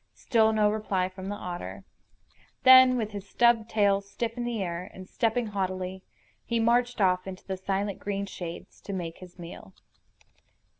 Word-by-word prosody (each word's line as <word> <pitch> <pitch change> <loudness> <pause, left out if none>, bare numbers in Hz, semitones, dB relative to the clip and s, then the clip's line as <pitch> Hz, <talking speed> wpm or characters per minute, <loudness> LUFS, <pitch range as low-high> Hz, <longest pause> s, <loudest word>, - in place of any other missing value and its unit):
Still 220 -2 +3
no 210 -1 +3
reply 195 -4 -1
from 190 +1 -8
the 205 - -3
otter. 180 -3 -6 0.8
Then, 260 -1 +8
with 220 -3 -2
his 200 -1 -8
stub 235 -2 +3
tail 200 -2 +3
stiff 225 +3 -4
in 240 -1 -3
the 240 -2 -2
air, 175 0 -4
and 185 0 -10
stepping 230 +2 0
haughtily, 190 -2 -3 0.4
he 235 - -1
marched 240 +1 +2
off 185 -1 +2
into 190 -1 -8
the 190 - -3
silent 195 +1 -2
green 200 -1 -3
shades 175 -3 -8
to 200 - -6
make 170 -3 -5
his 180 -1 -13
meal. 170 - -10
200 Hz, 165 wpm, -28 LUFS, 185-225 Hz, 0.8 s, Then